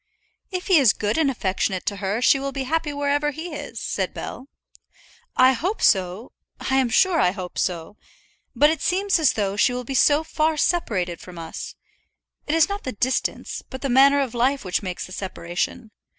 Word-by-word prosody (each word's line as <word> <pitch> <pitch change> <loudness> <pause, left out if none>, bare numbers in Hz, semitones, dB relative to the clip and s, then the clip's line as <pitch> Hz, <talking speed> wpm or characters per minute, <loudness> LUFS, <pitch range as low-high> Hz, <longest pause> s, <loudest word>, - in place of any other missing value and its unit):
"If 365 -1 -4
he 370 -5 +5
is 255 -7 +5
good 210 0 -1
and 305 -3 +3
affectionate 190 -5 -1
to 200 - -2
her 200 +4 -2
she 275 - +5
will 275 0 -3
be 270 0 -3
happy 315 +3 -1
wherever 285 +1 0
he 320 +4 -6
is," - - -6
said - - -3
Bell. 260 - -7 0.9
"I 255 +1 +6
hope 355 - -2
so; 190 +5 +1 0.3
I'm 265 -2 +1
sure 345 - +3
I 180 - +4
hope 185 -1 -6
so. 175 +3 -3 0.6
But 295 +1 +5
it 320 - -3
seems 390 0 +1
as 305 -5 +3
though 200 -2 -1
she 230 +4 +3
will 250 0 -3
be 270 - -5
so 290 +4 +4
far 315 0 0
separated 195 - 0
from 180 -1 -12
us. 165 -1 -7 0.7
It 300 - +1
is 325 -2 +5
not 405 0 -5
the 255 - -4
distance, 255 +5 -2
but 260 - -8
the 275 - -1
manner 275 +3 +5
of 260 -4 -3
life 255 +1 +1
which 180 - -1
makes 185 -3 -5
the - - -13
separation. 185 +3 -4
260 Hz, 195 wpm, -23 LUFS, 200-295 Hz, 0.9 s, I